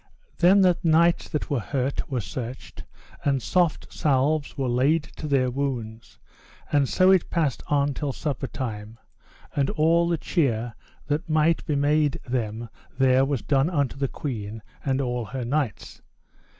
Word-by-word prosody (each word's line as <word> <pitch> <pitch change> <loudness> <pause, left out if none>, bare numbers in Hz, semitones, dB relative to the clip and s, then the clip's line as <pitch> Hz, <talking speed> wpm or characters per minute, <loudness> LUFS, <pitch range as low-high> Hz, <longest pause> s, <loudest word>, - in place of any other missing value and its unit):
Then 185 +3 +6
the 180 -2 +4
knights 170 0 +3
that 150 - -3
were 140 - +1
hurt 135 +3 -2
were 130 -4 -1
searched, 125 +4 -7 0.4
and 140 -2 +2
soft 175 +4 0
salves 145 +1 +1
were 135 -2 -1
laid 135 +6 +2
to 155 - -5
their 130 -3 +2
wounds; 120 -4 -4 0.5
and 140 -2 +2
so 185 +1 +4
it 190 -3 +3
passed 155 -7 0
on 145 -1 +1
till 145 0 -3
supper 140 -1 -3
time, 110 -4 -6 0.6
and 140 -2 +1
all 165 +2 +3
the 170 -1 +1
cheer 120 - 0 0.3
that 155 +4 -2
might 155 +1 +2
be 150 - 0
made 145 0 +2
them 115 -2 -2 0.3
there 130 0 +4
was 135 -3 -2
done 140 +2 +2
unto 145 -7 0
the 135 0 -1
queen 110 -6 -5 0.2
and 135 0 0
all 125 -2 -2
her 125 +2 -5
knights. 135 -3 -3
140 Hz, 155 wpm, -25 LUFS, 125-155 Hz, 0.6 s, Then